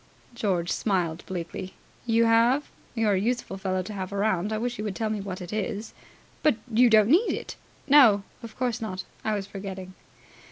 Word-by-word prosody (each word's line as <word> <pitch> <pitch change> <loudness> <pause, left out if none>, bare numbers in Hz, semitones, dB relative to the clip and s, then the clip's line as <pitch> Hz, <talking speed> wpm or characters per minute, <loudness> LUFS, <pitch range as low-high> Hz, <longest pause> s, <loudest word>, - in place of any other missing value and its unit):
George 185 -7 -1
smiled 175 -5 -1
bleakly. 185 +1 -5 0.3
"You 230 0 +4
have? 235 +5 +3 0.2
You're 220 -3 +2
a 190 - +2
useful 235 -2 -2
fellow 185 -1 -1
to 210 - -7
have 190 -1 -5
around. 200 -1 0
I 215 - 0
wish 240 +1 -3
you - - -2
would 205 -3 -3
tell 220 +1 -1
me 210 -2 -2
what 190 -1 -6
it 180 +3 -7
is." 215 +1 -3 0.5
"But 305 - +4 0.2
you 240 +2 +6
don't 215 -2 +6
need 360 - +4
it." - - -6 0.3
"No, 250 -9 +7 0.2
of 230 -2 -10
course 245 -3 -1
not. 190 -4 -4 0.2
I 215 -1 0
was 200 -1 -3
forgetting." 190 -2 -7
210 Hz, 190 wpm, -26 LUFS, 190-230 Hz, 0.5 s, No